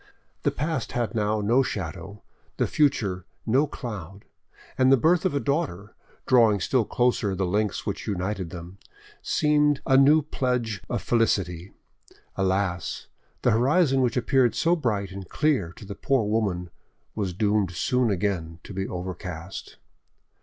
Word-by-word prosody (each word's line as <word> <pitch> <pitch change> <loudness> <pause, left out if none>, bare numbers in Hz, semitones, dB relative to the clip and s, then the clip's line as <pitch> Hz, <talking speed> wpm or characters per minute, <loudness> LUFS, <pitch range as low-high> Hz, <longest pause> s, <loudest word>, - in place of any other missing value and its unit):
The - - +2
past 160 +2 -3
had 120 -1 -1
now 105 -1 0
no 115 +6 +3
shadow, 100 - -5 0.3
the - - +2
future 100 -11 +1 0.2
no 135 +6 +3
cloud, 100 - -7 0.5
and 130 0 +4
the 135 - +7
birth 170 +8 +3
of 180 - +1
a - - +2
daughter, 140 - -2 0.3
drawing 115 -5 +5
still 120 +4 +1
closer 120 -5 +1
the 95 0 0
links 105 +3 -1
which - - -4
united 95 -2 -2
them, 90 +2 -9 0.4
seemed 150 -1 +2
a 135 - +4
new 145 +3 +6
pledge 125 -7 -2
of - - -2
felicity. 95 -6 0 0.6
Alas! 95 -2 -1 0.3
the 125 - +4
horizon 135 +4 +3
which 125 -1 +1
appeared 125 0 +2
so 170 +1 +3
bright 105 - -1
and 95 -2 -8
clear 140 - +1
to 105 - -12
the 100 - -6
poor 130 +2 0
woman 100 -5 -1 0.4
was 95 -5 -3
doomed 105 -1 +1
soon 125 +7 +1
again 90 -4 -2
to - - -9
be 95 0 -3
overcast. 90 0 -6
105 Hz, 145 wpm, -25 LUFS, 95-130 Hz, 0.6 s, the